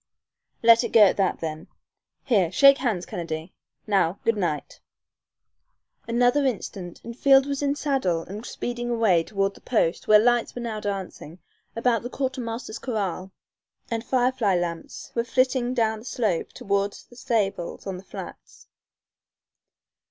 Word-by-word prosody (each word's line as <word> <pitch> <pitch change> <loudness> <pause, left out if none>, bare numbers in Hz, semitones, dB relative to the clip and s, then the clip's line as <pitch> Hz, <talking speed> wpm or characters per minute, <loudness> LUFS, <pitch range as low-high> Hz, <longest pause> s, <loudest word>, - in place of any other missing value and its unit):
"Let 230 0 +7
it - - -4
go 225 - +7
at 195 - +4
that 195 -2 0
then. 155 0 -5 0.6
Here, 195 -10 +2
shake 275 +6 +6
hands, 220 -9 -1
Kennedy. 165 -3 -5 0.3
Now, 195 -3 +1
good 230 - +2
night!" 175 -7 -3 1.3
Another 245 +4 +3
instant 195 -8 -4
and 235 0 -8
Field 270 +1 +5
was 280 0 -3
in 285 0 +1
saddle 260 - 0
and 205 +6 -8
speeding 240 0 -4
away 220 -8 +3
toward 195 +1 -1
the - - -17
post 200 -8 0
where 215 - +8
lights 240 +2 +2
were 245 - -5
now 220 -2 -3
dancing 195 -5 -5 0.4
about 230 -1 +1
the 245 - -6
quartermaster's 250 -4 -4
corral, 195 -6 -3 0.6
and 225 -1 -2
firefly 250 -6 +1
lamps 170 -1 -4
were 235 - 0
flitting 255 +1 +1
down 220 -2 +1
the 220 - -14
slope 215 -9 -1
toward 200 -4 -1 0.2
the - - -14
stables 205 -7 -2
on 190 -2 -4
the 185 - -11
flats. - - -10
225 Hz, 145 wpm, -25 LUFS, 190-245 Hz, 1.3 s, where